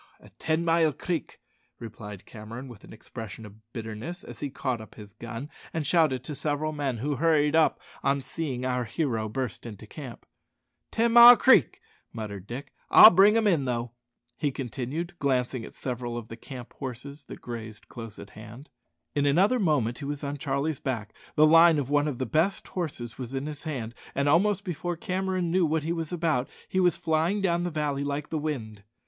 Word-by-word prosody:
"At - - -20
Ten 160 +1 0
mile 165 -2 +3
Creek," 170 0 -4 0.4
replied 105 -3 -9
Cameron 115 +4 -9
with 120 -5 -13
an - - -14
expression 110 -1 -9
of 110 +2 -16
bitterness, 115 - -6
as - - -10
he 145 - -3
caught 130 -4 -3
up 110 - -13
his 105 -2 -12
gun 115 +4 -7 0.3
and 160 -2 -1
shouted 145 -6 +2
to 150 - -6
several 150 +1 -2
men, 140 -5 -2
who 140 +4 -2
hurried 155 0 +3
up 160 -1 +3 0.2
on 140 0 +1
seeing 130 -2 -4
our 125 -1 0
hero 115 -4 -2
burst 125 -1 -4
into 110 -2 -9
camp. 130 +1 -10 0.6
"Ten 230 +1 +1
mile 240 0 +11
Creek!" 260 - +4 0.3
muttered 100 -3 -7
Dick. 125 +5 -7 0.2
"I'll 220 - +10
bring 200 +5 +6
'em 225 - +2
in, 165 -9 +3
though," 120 -1 -2 0.4
he 145 - 0
continued, 135 +6 -4
glancing 130 -3 0
at - - -10
several 120 -2 -4
of 115 -1 -7
the 115 - -7
camp 125 0 -10
horses 140 +2 -8
that - - -10
grazed 110 -3 -8
close 115 -3 -9
at - - -11
hand. 110 +7 -12 0.4
In 145 0 +1
another 195 - +3
moment 140 - +1
he 145 - -6
was 145 +1 -4
on 145 0 -3
Charlie's 140 +2 -1
back, 115 -6 -4 0.2
the 155 - +6
line 165 +1 +7
of 140 -1 -2
one 145 0 +3
of 140 -5 -3
the 130 - -2
best 160 - 0
horses 140 - -5
was 130 +1 -5
in 135 +1 -2
his 150 +1 -7
hand, 125 -7 -4 0.2
and 140 +1 +1
almost 195 +6 +3
before 175 0 -3
Cameron 185 -2 -1
knew 185 +1 +3
what 160 -1 +1
he 165 +2 -1
was 165 -1 -4
about 160 -7 0 0.2
he 190 - -1
was 180 -2 +3
flying 165 +4 +1
down 175 -3 +1
the - - -1
valley 150 -3 -2
like 145 +1 -3
the 160 - -2
wind. 115 -9 -4
140 Hz, 195 wpm, -27 LUFS, 120-165 Hz, 0.6 s, mile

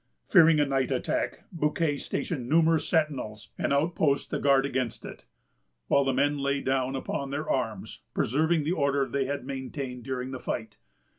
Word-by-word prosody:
Fearing 165 -6 +6
a 145 - +4
night 135 -2 0
attack, - - -1
Bouquet 150 -2 0
stationed 135 -3 -3
numerous 160 0 +3
sentinels 135 -10 -1
and - - 0
outposts 145 -1 +2
to - - -2
guard 135 -1 +4
against 130 -4 -2
it; - - -10 0.6
while 140 - +4
the 135 - +1
men 145 +2 +1
lay 140 0 0
down 130 -1 0
upon 135 +1 -3
their 145 +3 -3
arms, 110 -6 -2
preserving 155 +5 +2
the 155 - -1
order 140 -5 +1
they 140 -1 -1
had 140 -1 -3
maintained 130 -1 -5
during 130 0 -4
the 130 - -5
fight. 110 -4 -4
140 Hz, 165 wpm, -28 LUFS, 130-150 Hz, 0.6 s, Fearing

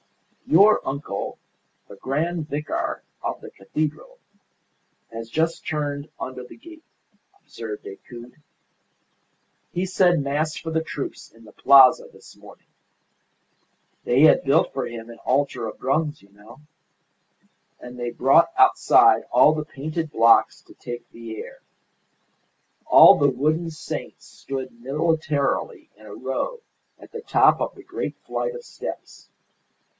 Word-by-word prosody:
"Your 200 +6 +5
uncle, 135 -7 -5 0.5
the - - -12
grand 155 - -3
vicar 150 +2 -3 0.2
of - - -4
the - - -12
cathedral, 155 - -5 1.0
has 115 0 -7
just 165 +6 -1
turned 145 -1 -3
under 130 -1 -6
the 125 - -14
gate," 325 +6 -15 0.6
observed 110 -2 -8
Decoud. 120 +4 -11 1.4
"He 180 +2 -2
said 180 -2 +2
Mass 150 +3 -2
for 165 - -6
the 160 0 -1
troops 145 -3 -7
in 115 0 -19
the 105 - -16
Plaza 135 -2 +6
this - - -17
morning. - - -17 1.4
They 125 +3 +2
had 155 - +6
built 140 +4 +2
for 135 - -3
him 115 -1 -9
an 115 -1 -12
altar 130 -3 -1
of 110 - -9
drums, 150 +3 -1
you 100 - -23
know. 105 +8 -16 1.2
And 125 0 -11
they 120 -1 -3
brought - - +3
outside - - +5
all 130 +5 +5
the 155 -1 -3
painted 155 +2 -5
blocks 115 -4 +4
to - - -18
take 120 0 -9
the 115 -1 -9
air. - - -10 1.3
All - - +8
the 145 - +4
wooden 155 +6 -1
saints 160 -1 -8
stood 130 -3 -8
militarily 150 +1 -1
in 110 - -16
a 100 - -10
row 135 - -4 0.4
at - - -15
the 460 - -6
top - - +3
of - - -3
the - - -14
great - - -5
flight - - -3
of 480 0 -10
steps. - - -9
140 Hz, 135 wpm, -23 LUFS, 120-160 Hz, 1.4 s, All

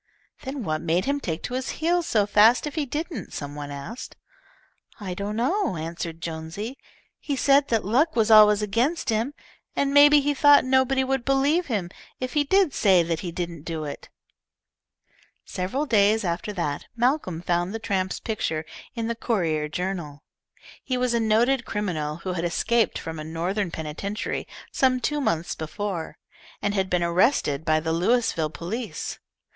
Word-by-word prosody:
"Then 265 -1 -5
what 155 -3 -2
made 170 +2 +1
him 285 +1 0
take 165 - -4
to - - -4
his 255 +1 -2
heels 340 +1 +1
so 210 -3 +2
fast 215 +6 +5
if 295 - -4
he 300 -3 -2
didn't?" 315 +5 -5
some 145 -1 -5
one 145 -1 -6
asked. 145 - -7 0.8
"I 190 -4 -4
don't 200 +3 -4
know," 255 - 0
answered 165 +1 -5
Jonesy. 170 +10 -5 0.4
"He 285 - -3
said 275 +1 +4
that 225 -4 0
luck 285 - +2
was 225 -1 +2
always 210 -1 +7
against 240 +11 0
him, 230 +6 0 0.4
and 280 0 +1
maybe 290 +1 +8
he 290 +1 +1
thought 290 0 +6
nobody 265 0 +3
would 265 -1 -1
believe 280 +6 +2
him 200 -8 -2 0.3
if 255 -1 -4
he 295 - +3
did 370 0 +3
say 190 -4 +4
that 165 -1 -2
he 175 - -5
didn't 170 -2 -5
do 160 0 -4
it." 145 -1 -7 1.4
Several 195 +11 -2
days 215 -3 +3
after 175 +4 -2
that 160 -7 -3
Malcolm 240 - 0
found 175 +1 -1
the 225 - -3
tramp's 195 -4 -2
picture 160 -8 -2 0.3
in 230 -1 -2
the 235 - -1
Courier 170 -10 -1
Journal. 170 -4 -4 0.6
He 255 - -1
was 250 -1 +1
a 235 - +2
noted 235 +4 +2
criminal 175 -10 -3
who 185 - -1
had 170 -1 -3
escaped 225 +7 +1
from 160 -1 -6
a - - -5
Northern 175 +5 -2
penitentiary 165 +7 -4 0.2
some 255 -1 +2
two 295 +3 -1
months 170 - 0
before, 170 +1 -5 0.4
and 205 0 -1
had 190 -2 0
been 180 -1 +1
arrested 170 - +2
by 155 -1 +2
the 160 +1 -2
Louisville 175 -3 +1
police. 215 +9 -5
210 Hz, 170 wpm, -25 LUFS, 170-260 Hz, 1.4 s, maybe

